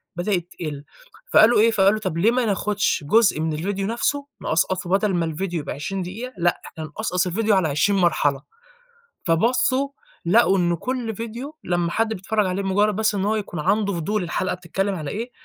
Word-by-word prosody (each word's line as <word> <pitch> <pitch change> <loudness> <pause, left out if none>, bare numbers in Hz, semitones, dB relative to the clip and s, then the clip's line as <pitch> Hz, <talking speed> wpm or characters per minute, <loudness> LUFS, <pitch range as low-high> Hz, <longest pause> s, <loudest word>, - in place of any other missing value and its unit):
بدأت 175 -1 -1
تقِل، 150 -4 -5 0.5
فقالوا 220 +1 +6
إيه، 230 +2 +5
فقالوا 205 0 +3
طَب 185 -6 -3
ليه 205 +7 +4
ما 250 0 +1
ناخدش 205 -4 0
جزء 220 -4 +4
من 160 0 -1
الفيديو 195 +5 -2
نفْسُه، 275 +5 -1 0.2
نقصقصه 175 +2 0
بدل 200 +2 +2
ما 170 -2 +1
الفيديو 170 +2 -3
يبقى 145 - -5
20 190 +7 -4
دقيقة 220 +8 -6
لأ، 175 0 +1
إحنا 160 - -8
نقصقص 180 +3 -2
الفيديو 210 +4 +1
على 185 -4 +2
20 155 +8 +2
مرحلة، 145 -6 +2 0.8
فبَصُّوا 255 - +2 0.4
لقوا 195 +1 +4
إنه 175 -1 +1
كُل 245 +3 -3
فيديو 235 +7 -6
لمّا 175 -1 0
حد 225 +4 0
بيتفرج 210 +2 -1
عليه، 185 +2 -1
بمجرد 205 +1 +1
بس 215 0 +1
إن 195 -1 -1
هو 215 +2 +1
يكون 200 -6 -4
عنده 200 +6 +1
فضول 190 +4 -1
الحلقة 180 +2 -2
بتتكلم 195 +3 -2
على 155 -5 -5
إيه، 230 +4 -4
195 Hz, 185 wpm, -23 LUFS, 175-220 Hz, 0.8 s, فقالوا